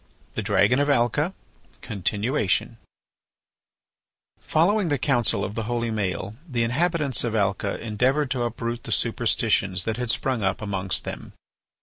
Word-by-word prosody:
THE - - -2
DRAGON 125 +6 +3
OF 145 0 +2
ALCA 145 - +2 0.5
(Continuation) 105 - 0 1.6
Following 185 +3 +2
the 145 - +1
counsel 125 -2 +2
of 95 - -5
the 115 0 -3
holy 120 -1 -1
Maël 100 -1 -2 0.2
the 120 -3 0
inhabitants 150 +2 +1
of 115 -2 -1
Alca 100 -1 0
endeavoured 130 +6 0
to 130 - 0
uproot 120 0 -3
the - - -5
superstitions 110 -5 +1
that 110 +2 -2
had 125 -1 -3
sprung 125 0 0
up 95 0 0
amongst 95 -3 -2
them. - - -7
120 Hz, 135 wpm, -25 LUFS, 105-135 Hz, 1.6 s, DRAGON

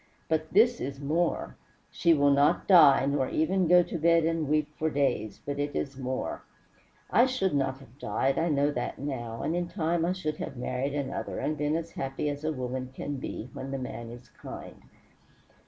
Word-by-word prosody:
But 160 -1 0
this 235 +5 +4
is 135 +1 -4
more. 160 +4 -1 0.3
She 170 - +2
will 145 -3 +4
not 140 +1 +3
die, 150 -8 +7
nor 140 -2 0
even 185 +3 +1
go 180 +1 +7
to 170 - -5
bed 165 0 +4
and 165 -3 0
weep 150 0 +2
for 160 +1 0
days, 130 -8 -1
but 145 0 -3
it 145 0 -2
is 140 -1 -2
more. 130 -1 -3 0.7
I 240 +3 +5
should 255 - 0
not 135 -2 0
have 135 0 -18
died, 135 -1 0
I 165 +1 +1
know 145 -1 +2
that 125 -4 -3
now, 120 -5 -5
and 165 - 0
in 175 0 -1
time 170 0 0
I 175 +2 +1
should 155 -5 -3
have 135 - -6
married 130 +3 -2
another, 140 -2 -3
and 155 - -1
been 150 +1 0
as 165 0 -3
happy 135 +2 -3
as 145 +1 -7
a 155 - 0
woman 130 -2 -4
can 145 0 -4
be 130 -1 -6
when 135 - -6
the 135 - -3
man 120 -3 -6
is 120 +1 -11
kind. - - -10
145 Hz, 200 wpm, -28 LUFS, 135-165 Hz, 0.7 s, die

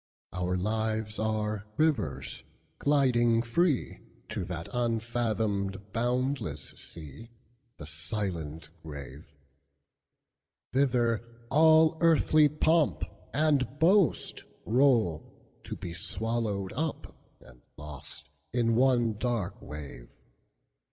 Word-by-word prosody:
Our 90 +1 -1
lives 110 +2 -1
are 110 -1 -1
rivers, 105 - 0 0.4
gliding 120 -5 +3
freeTo 120 - -2
that 85 -2 -5
unfathomed, 110 -4 -1
boundless 120 - -1
sea, 80 - -11 0.5
The 75 - -8
silent 80 -2 -4
grave! 70 -1 -9 1.4
Thither 120 -4 +2 0.3
all 160 +2 +6
earthly 155 -2 +5
pomp 155 +1 +2 0.3
and 145 -3 +2
boastRoll, 135 - +2 0.4
to - - -5
be 85 - -6
swallowed 105 0 -2
up 155 +5 -2 0.3
and 65 -2 -18 0.2
lostIn 75 - -4
one 120 -2 +3
dark 115 -6 -2
wave. 70 -5 -9
110 Hz, 80 wpm, -29 LUFS, 90-130 Hz, 1.4 s, all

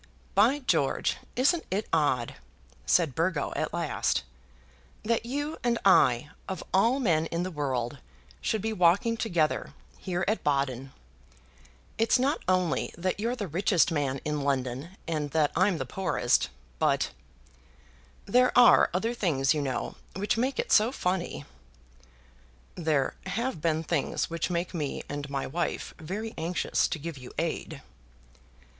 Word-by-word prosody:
"By 230 +8 +4
George! 275 - +1 0.2
isn't 295 +7 +3
it 200 +3 -1
odd," 130 -7 +1 0.5
said 165 -6 +3
Burgo, 165 0 0
at - - -1
last, 70 - 0 0.8
"that 230 +1 0
you 290 +5 -3
and 240 -1 +2
I, 135 -7 +5 0.2
of 190 - -4
all 230 +8 +4
men 165 - +2
in 170 +2 -2
the 185 - -4
world, 130 -6 -2 0.4
should 220 - -1
be 220 0 -1
walking 195 +5 +3
together 175 -9 0 0.2
here 180 -1 -2
at 215 +2 0
Baden? 135 -2 0 1.1
It's 225 +3 +4
not 270 +4 +1
only 185 -2 +1
that 185 +3 -1
you're 235 +3 0
the 210 -5 -4
richest 175 +1 +2
man 140 -4 -1
in 150 -1 -1
London, 135 +5 -2
and 155 -3 -1
that 150 -2 +3
I'm 185 0 +3
the - - -3
poorest, 185 -11 +1 0.3
but; - - +2 1.1
there 250 +5 +4
are 245 - +7
other 225 +6 0
things, 150 - +1
you 150 - -1
know, 135 -2 -3 0.2
which 200 +2 0
make 255 +4 0
it - - -2
so 220 +3 +5
funny." 180 - -2 1.3
"There 155 -6 0
have 230 - -2
been 160 -1 +1
things 165 0 -1
which 165 +1 -1
make 175 +1 -2
me 150 -5 -3
and 145 0 -5
my 140 -1 -2
wife 170 +6 -3
very 205 +8 -5
anxious 170 +3 0
to - - -3
give 155 -1 -6
you 125 - -10
aid." 165 +1 -3
175 Hz, 145 wpm, -28 LUFS, 145-215 Hz, 1.3 s, are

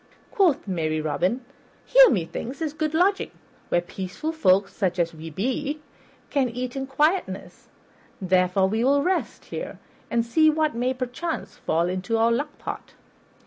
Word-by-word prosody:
Quoth 350 - +2
merry 160 -4 -1
Robin, 180 - -1 0.4
"Here, - - +8
methinks, 225 +8 -2
is 315 -3 -2
good 310 0 -2
lodging, 385 +4 +2 0.4
where 175 - +2
peaceful 190 - -5
folk, 195 - +3
such 185 -4 -2
as 170 -1 0
we 160 0 -8
be, 265 - -2 0.5
can 270 -3 +2
eat 250 +2 -4
in 270 0 -3
quietness; 305 +7 -1 0.5
therefore 185 0 +3
we 220 +4 0
will 280 +2 +3
rest 370 +3 -1
here, - - -6 0.3
and 230 -1 +1
see 310 +7 +4
what 310 0 +1
may, 250 +3 0
perchance, 255 +6 -4
fall 165 +2 0
into 185 +5 -1
our 225 +1 +3
luck 290 +5 -2
pot." - - -7
245 Hz, 150 wpm, -25 LUFS, 185-300 Hz, 0.5 s, Here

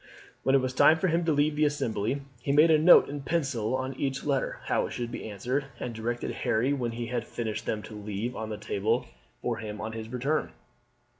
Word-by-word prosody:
When 135 - +3
it 135 - +5
was 130 0 -2
time 155 +4 +6
for 185 +3 +1
him 165 +1 +1
to 165 - +2
leave 145 +1 +3
for - - -8
the 150 - +4
Assembly 135 -3 -1 0.2
he 140 - -1
made 155 +3 +6
a 155 - +6
note 175 +3 +8
in 145 0 -5
pencil 135 -7 0
on 130 +1 -2
each 135 -1 -1
letter 140 -3 -1
how - - +1
it - - -8
should 120 -1 -4
be 110 - -5
answered, 125 +8 -2
and 120 - -4
directed 120 +2 -3
Harry 125 +6 +1
when 120 -4 -2
he 120 +1 -4
had 120 0 -2
finished 110 -3 -4
them 105 -1 -1
to - - -10
leave 105 +3 -4
them - - -6
on 110 - -4
the 105 - -4
table 110 +5 0 0.4
for 120 -2 -1
him 105 -1 -6
on 110 - -4
his 110 0 -6
return. 130 +6 -1
125 Hz, 235 wpm, -28 LUFS, 110-145 Hz, 0.4 s, note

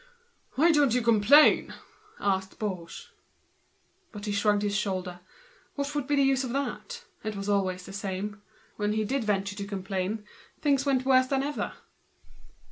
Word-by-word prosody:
"Why 330 +5 +5
don't 290 -6 +3
you 250 - +1
complain?" 235 +6 +5 0.4
asked 190 -1 -1
Baugé. 185 -6 -5 1.0
But 205 -1 -8
he 210 - -2
shrugged 205 0 +2
his 205 -1 -1
shoulders. 185 -3 -2 0.6
What 280 0 -3
would 290 -3 -2
be 290 - +2
the 275 -1 +4
good? 280 - -3 0.3
It 215 -1 -3
was 195 0 -5
always 190 -3 0
the 195 - -10
same. 200 +1 -4 0.4
When 210 0 0
he 215 0 0
ventured 205 -4 -1
to 200 - -4
complain 195 +1 -3 0.3
things 280 -2 +1
went 260 -2 +2
worse 260 -1 +4
than 270 0 0
ever. 290 +1 -3
210 Hz, 145 wpm, -28 LUFS, 195-270 Hz, 1.0 s, Why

